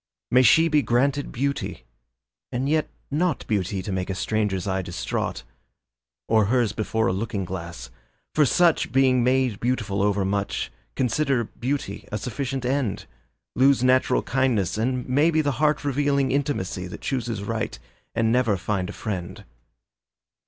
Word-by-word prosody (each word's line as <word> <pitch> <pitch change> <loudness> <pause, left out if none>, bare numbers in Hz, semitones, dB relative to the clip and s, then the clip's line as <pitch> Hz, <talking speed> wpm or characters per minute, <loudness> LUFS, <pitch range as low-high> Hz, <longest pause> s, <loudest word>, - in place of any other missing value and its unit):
May 125 - +6
she 160 +7 +6
be 150 -2 +3
granted 135 +4 +1
beauty 140 - -2 0.7
and 125 +2 -1
yet 155 +1 +1 0.2
not 160 0 0
Beauty 95 -2 -1
to 100 - -4
make 95 0 -2
a 95 - -2
stranger's 105 -2 -1
eye 95 0 0
distraught, 90 -8 -3 0.8
Or 110 -2 +4
hers 120 0 +2
before 110 +1 -1
a - - +1
looking 100 -1 -2
glass, 85 -9 -7 0.4
for 155 - +4
such, 170 +4 +3
Being 130 -2 +4
made 125 -4 +2
beautiful 110 -5 -1
overmuch, 100 0 0 0.2
Consider 130 0 +1
beauty 130 +5 -4
a 105 - -1
sufficient 130 +2 -3
end, 125 -6 -1 0.5
Lose 135 -1 +4
natural 130 0 +3
kindness 125 -8 +1
and 125 +3 -1
maybe 155 +5 +3
The 145 -2 +2
heart 150 -1 +2
revealing 140 -1 +1
intimacy 130 -10 -1
That 90 - -9
chooses 120 -6 -2
right 110 +1 -3 0.4
and 115 -1 +2
never 115 -4 +2
find 95 0 -2
a - - -6
friend. 95 -4 -5
120 Hz, 145 wpm, -24 LUFS, 100-135 Hz, 0.8 s, May